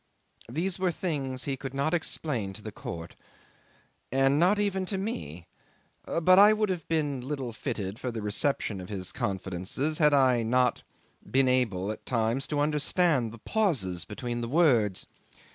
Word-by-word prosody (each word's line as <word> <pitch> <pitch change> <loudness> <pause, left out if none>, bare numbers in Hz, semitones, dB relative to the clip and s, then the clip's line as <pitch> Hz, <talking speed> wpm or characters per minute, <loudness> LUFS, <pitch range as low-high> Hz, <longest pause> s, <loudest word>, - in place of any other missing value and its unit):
These 175 +8 -2
were 185 -1 +2
things 140 -7 -3
he 140 - -2
could 135 0 -7
not 140 +4 0
explain 135 - -2
to 105 - -11
the 110 - -6
court 85 -4 -7 1.0
and 135 +2 +3
not 185 +5 +4
even 200 -2 0
to 195 - -2
me; 90 - -5 0.6
but 185 +3 +4
I 210 +2 +8
would 215 -1 0
have 175 -4 -3
been 145 -5 0
little 130 -2 -4
fitted 110 -4 -4
for 125 - -3
the 110 -2 -5
reception 105 -2 -1
of 90 - -9
his 95 -3 -4
confidences 95 - -2
had 150 -2 +6
I 130 -3 +4
not 125 +2 +2 0.5
been 135 0 +3
able 110 -7 +1
at 110 - -8
times 120 +3 0
to 150 -1 -1
understand 150 -3 +2
the 115 - -10
pauses 120 - 0
between 120 +2 -4
the 115 - -3
words. 120 - +3
130 Hz, 160 wpm, -28 LUFS, 110-160 Hz, 1.0 s, I